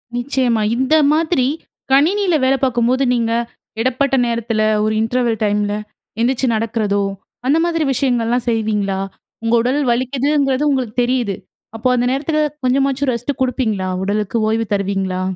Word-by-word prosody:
நிச்சயமா, 245 -3 0
இந்த 260 +5 +2 0.2
மாதிரி 310 -5 +1 0.4
கணினியில 350 +7 +3
வேலை 270 +1 +3
பார்க்கும்போது, 250 +1 +2
நீங்க 230 -2 0 0.5
இடைப்பட்ட 260 +3 +1
நேரத்தில 230 -2 -1 0.2
ஒரு 215 0 +1
இன்டர்வல் 230 0 0
டைமில 205 0 0 0.5
எந்திரிச்சு 255 +2 +1
நடக்கிறதோ, 215 -2 0 0.4
அந்த 290 +4 +3
மாதிரி 330 -2 0
விஷயங்கள்லாம் 245 -2 0
செய்வீங்களா? 210 -4 0 0.4
உங்க 230 - 0
உடல் 260 +5 0
வலிக்குதுங்கிறது 270 +3 +1
உங்களுக்கு 255 -5 -1
தெரியுது. 240 -5 0 0.4
அப்போ 225 - -1
அந்த 245 0 +1
நேரத்திக்கு 305 +3 0 0.2
கொஞ்சமாச்சு 270 +1 +1
ரெஸ்ட் 245 +4 -4
கொடுப்பீங்களா? 225 -7 0
உடலுக்கு 210 +3 -1
ஓய்வு 225 +1 0
தருவீங்களா? 195 -2 -1
245 Hz, 125 wpm, -18 LUFS, 220-270 Hz, 0.5 s, கணினியில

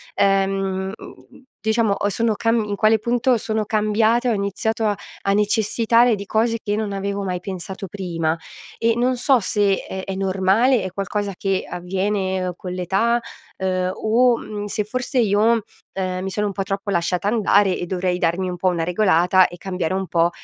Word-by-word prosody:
ehm, 195 -1 +1
mhmm, - - -14 0.2
diciamo, 220 -1 +2
o 205 - -1
sono 225 +2 0
cam 225 +1 +1
in 205 -1 -3
quale 215 +2 +3
punto 240 +2 +2
sono 220 0 -2
cambiata, 220 +3 +2
e - - +2
ho - - +1
iniziato 215 +3 -1
a 205 -1 +1 0.3
a 195 - +4
necessitare 225 +3 +3
di 200 0 -7
cose 225 +2 +1
che 205 - -1
non 215 -1 -2
avevo 200 0 -3
mai 180 -2 -2
pensato 190 +1 -6
prima. 170 -4 -2 0.4
E 230 0 +2
non 250 +2 +1
so 255 +1 +3
se 200 -1 +1
è 190 0 -5
è 195 - -4
normale, 195 +5 +2
è 190 - -4
qualcosa 200 +1 -3
che 195 0 -1
avviene 185 0 -2
con 180 0 -7
l'età, 195 +7 +1 0.4
uhm, 185 -1 0
o, 235 +2 +3
mhmm, 210 -2 -6
se 210 +1 -2
forse 255 +5 -3
io, 220 +1 +3 0.3
ehm, 185 -1 -3
mi 190 - -2
sono 210 +2 -1
un - - -2
po' 195 - -3
troppo 195 +1 -3
lasciata 180 +1 0
andare, 205 -3 +3
e 175 - -4
dovrei 180 0 -1
darmi 175 +2 0
un 180 -1 -4
po' 185 - 0
una 175 -2 +1
regolata, 180 0 +4
e 175 - -11
cambiare 185 -1 -2
un 190 0 -1
po' 170 0 +2
200 Hz, 185 wpm, -21 LUFS, 185-220 Hz, 0.4 s, a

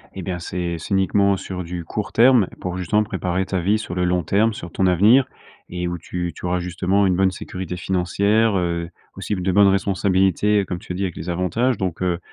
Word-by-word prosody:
et 95 - -5
bien 90 0 -4
c'est 85 0 -3
c'est 80 - -9
uniquement 100 +1 +3
sur 90 -1 -6
du 85 0 -5
court 105 +5 -5
terme 120 -4 +5
pour 90 0 -4
justement 100 +4 +1
préparer 95 -3 -2
ta 95 -1 -2
vie 100 +5 +2
sur 100 -5 -6
le 90 0 0
long 90 -1 +1
terme, 110 +5 +2
sur 85 -4 -8
ton 95 +2 +1
avenir. 105 +9 +5 0.4
Et 90 0 -3
où 90 - -3
tu 90 0 -4
tu - - -9
auras 90 +1 0
justement 90 +3 0
une 95 - +2
bonne 95 -1 +3
sécurité 90 -1 -6
financière, 100 +4 +1
heu, 85 -1 -2 0.3
aussi 105 - -3
de 90 +1 -1
bonnes 100 +2 +5
responsabilités, 95 +1 +2
comme 90 -2 -5
tu 90 - -7
as - - -5
dit, 95 - -2
avec 90 -3 -3
les 85 - -6
avantages 100 +8 0
donc 90 -3 -3
heu 90 -1 0
95 Hz, 220 wpm, -21 LUFS, 90-100 Hz, 0.4 s, terme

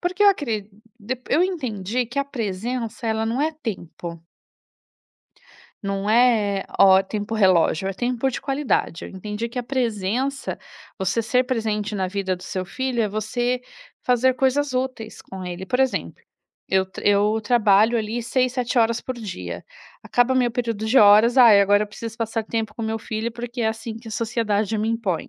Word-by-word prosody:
porque 365 +3 -1
eu - - +8
acredi 230 - 0 0.3
dep 245 +4 -5
eu 335 +5 +4
entendi 245 - -2
que 255 +4 -5
a 280 - +2
presença 230 0 -4
ela 220 0 0
não 230 +4 -1
é 310 +2 +1
tempo. 175 - -7 1.6
Não 195 +1 -2
é, 220 -4 +3
ó. 190 0 +7
tempo 210 +3 -4
relógio, 185 -3 +3
é - - -2
tempo 245 +5 -1
de - - -5
qualidade. 270 - -1
Eu - - -8
entendi 210 +4 -5
que 250 - -6
a - - -1
presença, 245 +1 -1 0.4
você 190 +4 0
ser 250 +3 +2
presente 220 -4 -2
na 190 -1 0
vida 190 -1 -2
do 180 - -14
seu 185 0 -4
filho, 255 +4 -2
é 210 - 0
você 240 +4 -1 0.4
fazer 250 +1 +3
coisas 270 +2 +1
úteis 255 -4 -3
com 190 -1 -9
ele, 180 +1 -6
por 250 +7 0
exemplo, 265 -1 -1 0.5
eu 190 0 +2 0.2
eu 205 +2 +3
trabalho 220 0 +4
ali 225 +2 -3
6, 255 +1 +1
7 250 -1 -1
horas 230 0 +2
por 255 - -5
dia, 90 - -6 0.4
acaba 245 +2 +2
meu 245 -2 +2
período 230 -3 -2
de 255 +4 +4
horas: 215 +4 +6
"Ai, 225 -5 +8
agora 205 +1 +4
eu - - -3
preciso 225 +1 -7
passar 225 -1 -2
tempo 220 -2 -3
com 230 - -4
meu 220 0 -2
filho, 220 +1 -4
porque 240 +1 -6
é 220 - +2
assim 225 0 -5
que 225 0 -13
a - - -8
sociedade 220 -1 -1
me 215 +1 0
impõe.", 225 -7 -2
225 Hz, 180 wpm, -23 LUFS, 205-250 Hz, 1.6 s, eu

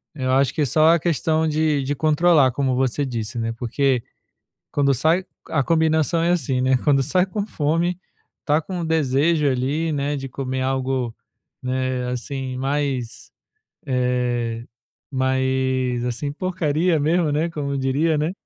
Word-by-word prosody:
Eu 130 -3 -1
acho 135 0 +3
que - - -1
é - - +3
só 155 +5 +4
a - - 0
questão 160 0 +1
de 155 -2 +1
de 140 +2 -1
controlar, 155 -2 +4
como 130 -1 0
você 130 +2 0
disse, 120 -2 -4
né. 115 0 -1
Porque 125 +2 0 0.7
quando 140 -1 +2
sai, 160 +8 +2 0.2
a 150 -3 +1
combinação 160 +1 +2
é 170 - +2
assim, 135 -7 0
né, 130 +1 +3
quando 140 -3 +4
sai 180 +7 +2
com 200 +2 -3
fome, 165 +1 0 0.4
está 150 +1 +1
com 175 +1 -5
desejo 155 0 +2
ali, 140 +5 0
né, 145 0 -1
de 135 0 -6
comer 130 0 -4
algo, 130 -2 -1 0.5
né, 130 0 -1
assim, 130 +1 -4
mais, 135 -3 -2 0.5
eh, 125 -3 -1 0.5
mais 130 -2 0
assim 125 +4 -3
porcaria 170 -1 0
mesmo, 160 +2 +2
né, 155 +3 +1
como 140 -3 -3
diria, 145 +4 +1
né. 155 +4 0
140 Hz, 150 wpm, -22 LUFS, 130-160 Hz, 0.7 s, só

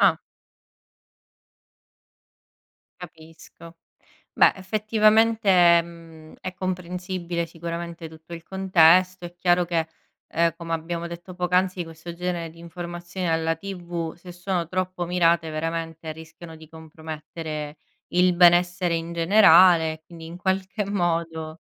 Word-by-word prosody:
ah. - - +4 2.8
Capisco. 165 0 -14 0.6
Beh, - - +5
effettivamente, 215 -3 +3
mhmm, 165 -2 -14
è 185 0 -6
comprensibile 180 -1 -4
sicuramente 170 0 -7
tutto 160 +1 -15
il 165 -1 -8
contesto, 185 -1 +3
è 175 0 -8
chiaro 175 0 +2
che, 165 -2 -1 0.4
ehm, 170 -1 +1
come 165 -1 -6
abbiamo 170 +1 -3
detto 170 +1 -9
poc'anzi, 180 0 0
questo 165 +1 -10
genere 175 -1 -3
di 165 - -18
informazioni 175 +1 -6
alla 165 0 0
TV, 175 -3 -6
se 175 +1 -13
sono 180 -2 -3
troppo 185 -1 -2
mirate 170 -2 +2
veramente 165 0 -4
rischiano 160 +1 -12
di 160 -1 -15
compromettere 160 -1 -8 0.3
il 180 0 +3
benessere 175 0 +4
in 165 +1 -3
generale, 170 -3 +5
quindi 165 -2 -11
in 170 +2 -9
qualche 190 +2 -2
modo 165 -4 -2
170 Hz, 115 wpm, -24 LUFS, 165-180 Hz, 2.8 s, Beh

